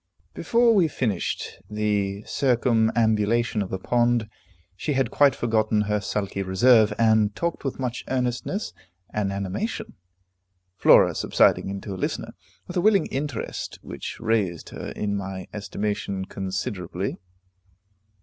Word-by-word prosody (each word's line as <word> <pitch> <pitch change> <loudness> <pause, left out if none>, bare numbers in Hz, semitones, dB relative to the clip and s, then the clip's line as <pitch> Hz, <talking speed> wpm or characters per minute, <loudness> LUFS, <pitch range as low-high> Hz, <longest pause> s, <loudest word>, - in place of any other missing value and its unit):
Before 235 0 +3
we 185 -6 +4
finished 115 - -2
the 105 -1 -1
circumambulation 115 -3 +2
of 95 - -3
the 95 - -2
pond, 120 +2 +1 0.5
she 145 +10 -2
had 135 -1 0
quite 140 -3 +4
forgotten 110 -2 +1
her 105 0 0
sulky 100 -1 -2
reserve, 105 +4 +5
and 110 -2 +3
talked 170 0 -2
with 135 - -3
much 125 -2 -3
earnestness 130 - -2 0.4
and 100 -2 0
animation, 100 - -3 0.8
Flora - - +6
subsiding - - +2
into 100 +1 -5
a 95 - -7
listener, - - -3 0.3
with 180 - -5
a - - +3
willing 205 0 +4
interest 135 -3 -4
which - - -7
raised 110 -7 0
her - - -7
in 100 -1 -1
my 95 -2 -5
estimation 100 -2 -3
considerably. 95 -1 -4
110 Hz, 125 wpm, -25 LUFS, 100-125 Hz, 0.8 s, Flora